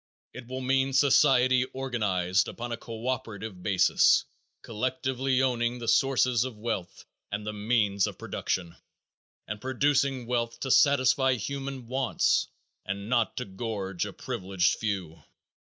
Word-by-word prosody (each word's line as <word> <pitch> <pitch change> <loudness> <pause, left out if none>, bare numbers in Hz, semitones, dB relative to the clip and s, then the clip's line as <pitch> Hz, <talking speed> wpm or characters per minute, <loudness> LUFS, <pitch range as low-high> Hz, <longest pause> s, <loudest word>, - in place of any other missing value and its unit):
If 125 -2 -9
will 130 +1 -5
mean 135 +1 +1
society 130 -2 +4
organized 105 -9 0
upon 120 +1 -6
a 120 - -2
co 115 0 -7
operative 110 -7 -4
basis, 90 -2 +4 0.4
collectively 130 +3 -1
owning 120 -1 0
the 120 -1 -7
sources 125 -2 +3
of 130 -4 -6
wealth 105 -5 -4 0.3
and 100 +1 -3
the 105 - -3
means 105 -2 +1
of - - -7
production, 85 -3 -3 0.7
and 105 0 -5
producing 130 0 +1
wealth 115 -1 -2
to 135 - -2
satisfy 130 -1 +4
human 135 +2 -5
wants 130 +1 +1 0.4
and 100 +2 -5
not 120 -2 +1
to 125 - -3
gorge 95 -2 -4
a - - -7
privileged 95 -5 -1
few. 95 -7 -3
120 Hz, 135 wpm, -28 LUFS, 105-130 Hz, 0.7 s, society